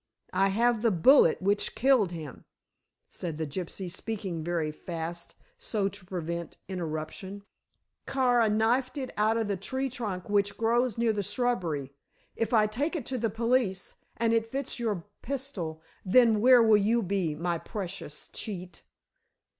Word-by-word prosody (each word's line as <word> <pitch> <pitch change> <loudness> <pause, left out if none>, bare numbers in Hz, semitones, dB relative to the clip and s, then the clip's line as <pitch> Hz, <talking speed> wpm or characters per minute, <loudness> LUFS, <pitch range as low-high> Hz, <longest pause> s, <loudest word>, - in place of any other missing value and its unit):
"I 195 +1 +3
have 230 +3 +2
the 230 - +4
bullet 185 - +5
which 205 +1 +1
killed 245 -7 +3
him," 155 -6 -8 0.6
said 165 -4 -5
the 160 - -2
gypsy, 180 +5 -5
speaking 190 -3 -4
very 165 -2 -1
fast 170 +1 -6 0.2
so 220 - -1
as 195 - 0
to 195 -1 -12
prevent 170 -2 -4
interruption. 180 +3 -5 0.6
"Kara 245 -4 +3
knifed 240 +6 +1
it 260 -2 -4
out 215 +2 +2
of 225 -2 0
the 200 -2 -1
tree 260 +7 -3
trunk 205 -7 -4
which 205 -1 +1
grows 235 +1 +1
near 230 -1 +2
the 205 - -1
shrubbery. 180 - -1 0.4
If 225 -1 -1
I 220 -3 +5
take 280 - -1
it 290 -8 -3
to 260 -2 -3
the 225 0 +1
police 230 -3 0 0.2
and 230 0 +2
it 225 0 +1
fits 270 -2 -3
your 210 -8 -2 0.2
pistol, 210 - -4 0.2
then 220 +1 +5
where 250 0 +7
will 220 -2 +6
you 220 +3 +2
be, 180 -5 -1
my 170 +1 -1
precious 190 -7 -6
cheat?" 185 -4 -6
205 Hz, 155 wpm, -29 LUFS, 175-235 Hz, 0.6 s, where